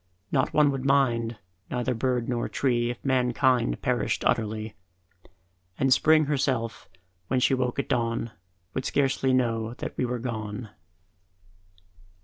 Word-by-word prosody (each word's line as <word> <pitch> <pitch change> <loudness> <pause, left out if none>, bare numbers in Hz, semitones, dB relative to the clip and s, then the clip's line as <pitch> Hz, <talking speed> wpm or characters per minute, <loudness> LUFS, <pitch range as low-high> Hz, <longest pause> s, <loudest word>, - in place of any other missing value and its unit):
Not - - +1
one 150 -2 +4
would 135 -2 -3
mind, 120 -5 +2 0.3
neither 125 +1 -1
bird 125 0 -1
nor 120 -2 -1
tree 120 -3 +1
If 120 +2 -6
mankind 125 - +2
perished - - 0
utterly; 110 -1 0 1.0
And 135 0 +4
Spring 155 +2 +4
herself, 130 -5 -1 0.4
when 130 - +1
she 125 - +3
woke 125 -2 0
at 140 - -1
dawn, 115 -1 -1 0.4
Would 130 - -2
scarcely 135 -1 +1
know 115 -2 0
that - - -6
we - - +2
were 125 0 -2
gone. 110 -2 -5
125 Hz, 130 wpm, -26 LUFS, 115-130 Hz, 1.0 s, one